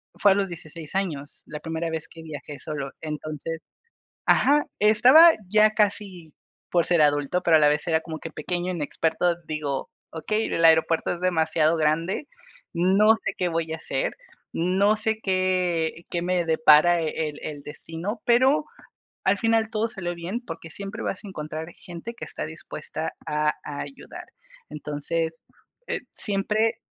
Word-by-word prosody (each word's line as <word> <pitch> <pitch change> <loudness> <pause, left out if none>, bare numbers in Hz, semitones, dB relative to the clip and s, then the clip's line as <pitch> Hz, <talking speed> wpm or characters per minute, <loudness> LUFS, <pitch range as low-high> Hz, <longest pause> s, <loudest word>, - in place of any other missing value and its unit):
fue 205 - +4
a - - -2
los 200 -1 +1
16 165 -1 -7
años, 150 -7 -3
la 150 - -6
primera 165 +1 -3
vez 160 0 -3
que 165 -1 -12
viajé 145 -2 -8
solo. 145 -3 -4
Entonces, 155 +1 -5 0.7
ajá, 295 +1 +4
estaba 255 +11 +8 0.2
ya 215 +1 +5
casi 200 -6 -1 0.4
por 175 -2 +2
ser 170 -3 +4
adulto, 145 +4 +2
pero 165 -2 +5
a - - +2
la 150 - +6
vez 150 +3 0
era 160 0 +2
como 160 -1 -7
que 165 - -7
pequeño, 180 +3 -3
inexperto. 165 +2 0
Digo, 150 -3 -3 0.2
okey, 215 +7 -1
el 165 - 0
aeropuerto 160 +1 +4
es 175 - -10
demasiado 160 -2 +2
grande, 165 - 0 0.5
no 195 +5 +5
sé - - -1
qué 180 -1 +1
voy 165 -1 -2
a - - -2
hacer, 135 -4 -2 0.4
no 190 +5 +2
sé 220 0 -1
qué 180 -3 0
qué 170 -1 -1
me 180 -1 +1
depara 160 +2 +5
el 155 -1 -3
el 145 -2 -6
destino, 165 +7 -6
pero 260 +5 +4 0.6
al 200 +1 +3
final 225 -1 +2
todo 220 0 0
salió 175 -5 -4
bien 185 +8 -4
porque 165 0 -8
siempre 200 +4 -7
vas 195 - -4
a - - -7
encontrar 155 -2 -6
gente 175 +6 -8
que - - -7
está - - -5
dispuesta - - -6
a 150 0 +1
ayudar. 150 - -8 0.5
Entonces, 150 +2 -2 0.6
eh, - - -1
siempre 215 +2 0
170 Hz, 155 wpm, -25 LUFS, 155-195 Hz, 0.7 s, estaba